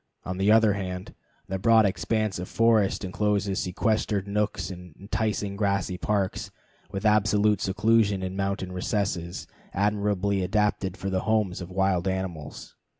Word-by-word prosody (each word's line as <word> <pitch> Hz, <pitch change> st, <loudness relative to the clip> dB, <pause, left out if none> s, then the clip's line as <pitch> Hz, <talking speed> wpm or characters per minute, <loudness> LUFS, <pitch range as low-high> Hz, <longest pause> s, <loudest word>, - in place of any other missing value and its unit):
On 90 Hz, 0 st, -4 dB
the 100 Hz, +2 st, +4 dB
other 110 Hz, -2 st, +5 dB
hand, 90 Hz, -2 st, -5 dB, 0.3 s
the 95 Hz, 0 st, -3 dB
broad 110 Hz, +2 st, +5 dB
expanse 110 Hz, 0 st, -1 dB
of 90 Hz, -, -6 dB
forest 110 Hz, -4 st, +2 dB
incloses 100 Hz, 0 st, 0 dB
sequestered 100 Hz, +1 st, 0 dB
nooks, 105 Hz, -1 st, -1 dB
and 90 Hz, -3 st, -10 dB
enticing 100 Hz, 0 st, -2 dB
grassy 100 Hz, -2 st, 0 dB
parks, 100 Hz, -3 st, -1 dB, 0.4 s
with 100 Hz, +1 st, -5 dB
absolute 105 Hz, -1 st, +3 dB
seclusion 105 Hz, 0 st, +2 dB
in 95 Hz, 0 st, -4 dB
mountain 95 Hz, -1 st, -2 dB
recesses 90 Hz, -2 st, -2 dB, 0.3 s
admirably 100 Hz, -1 st, +1 dB
adapted 100 Hz, 0 st, 0 dB
for 95 Hz, -, -4 dB
the 95 Hz, -, +1 dB
homes 105 Hz, -5 st, +1 dB
of 90 Hz, -, -7 dB
wild 95 Hz, -1 st, +1 dB
animals. 95 Hz, -5 st, -4 dB
100 Hz, 140 wpm, -26 LUFS, 95-105 Hz, 0.4 s, other